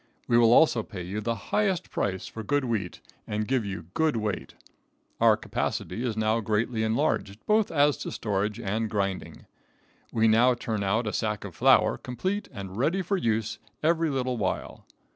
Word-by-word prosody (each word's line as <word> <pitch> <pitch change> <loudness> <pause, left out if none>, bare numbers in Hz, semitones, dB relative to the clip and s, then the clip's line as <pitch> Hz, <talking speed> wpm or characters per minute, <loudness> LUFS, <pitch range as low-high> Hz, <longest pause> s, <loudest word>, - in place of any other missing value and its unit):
We 120 - +2
will 115 -1 +6
also 125 -2 +5
pay 95 -4 -7
you 100 +5 -4
the 115 +2 -1 0.2
highest 195 -5 +1
price 95 -2 -2
for 110 - -7
good 145 +5 0
wheat, 110 -7 -3 0.3
and 105 0 -2
give 130 -3 +1
you 95 -4 -5
good 160 -3 +2
weight. 105 -4 -3 0.6
Our - - +5
capacity 115 - -3
is 115 -4 -2
now 110 +1 +2
greatly 110 +2 0
enlarged, 110 -2 0
both 215 0 +3
as 145 -2 +3
to - - -5
storage 105 0 -2
and 110 +3 -1
grinding. 100 -3 -3 0.7
We 115 0 +3
now 120 +3 +5
turn 110 -3 -3
out 110 +5 +1
a 105 - -2
sack 105 -2 -2
of 95 - -7
flour, 130 0 +4
complete 185 +11 -3
and 100 -5 -7
ready 165 +10 +1
for 195 +4 0
use, 115 - -1 0.2
every 165 0 +2
little 130 -3 -1
while. 100 -4 -3
115 Hz, 175 wpm, -27 LUFS, 105-130 Hz, 0.7 s, will